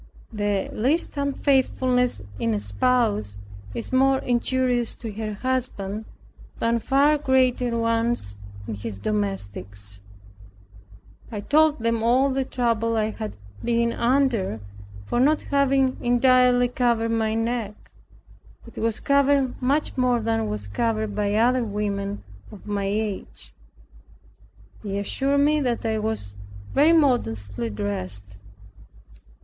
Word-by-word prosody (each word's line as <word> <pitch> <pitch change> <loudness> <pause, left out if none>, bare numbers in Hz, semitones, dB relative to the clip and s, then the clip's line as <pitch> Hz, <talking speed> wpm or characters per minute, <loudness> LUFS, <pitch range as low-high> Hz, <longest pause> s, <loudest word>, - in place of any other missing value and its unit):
The 205 -2 -1
least 285 +11 0
unfaithfulness 260 - +1 0.2
in 115 -1 0
a - - -1
spouse 105 - 0 0.4
is - - -5
more 265 +1 +4
injurious 245 -1 0
to 225 -2 -7
her 215 0 -4
husband, 220 -4 -2 0.5
than 230 0 +1
far 280 +6 +3
greater 255 -3 +2
ones 230 - 0 0.3
in 110 - -3
his 105 0 -6
domestics. 100 0 -3 1.3
I 210 -2 -4
told 300 +2 +3
them 230 -1 +1
all 255 +4 +3
the 265 0 0
trouble 230 -3 0
I 215 0 0
had 215 - -6 0.3
been 235 0 +1
under 235 - +1 0.5
for 240 - -1
not 295 +4 +3
having 275 -2 +2
entirely 245 0 +4
covered 235 -2 +1
my 220 -1 0
neck. 225 -2 -3 0.7
It 230 - -10
was 225 -1 -1
covered 280 -2 +2
much 280 +4 +1
more 250 -1 +2
than 225 0 -1
was 105 -1 -4
covered 220 - -1
by 205 0 0
other 245 +3 +3
women 205 -1 -3 0.3
of 205 - -13
my 205 -1 -2
age. 195 - -4 1.3
They 200 -1 -3
assured 275 +8 +1
me 300 +1 +3
that 240 -3 -1
I 220 -1 0
was 215 - -3 0.4
very 295 +4 +5
modestly 115 - +1
dressed. 100 -1 -4
230 Hz, 120 wpm, -24 LUFS, 200-255 Hz, 1.3 s, very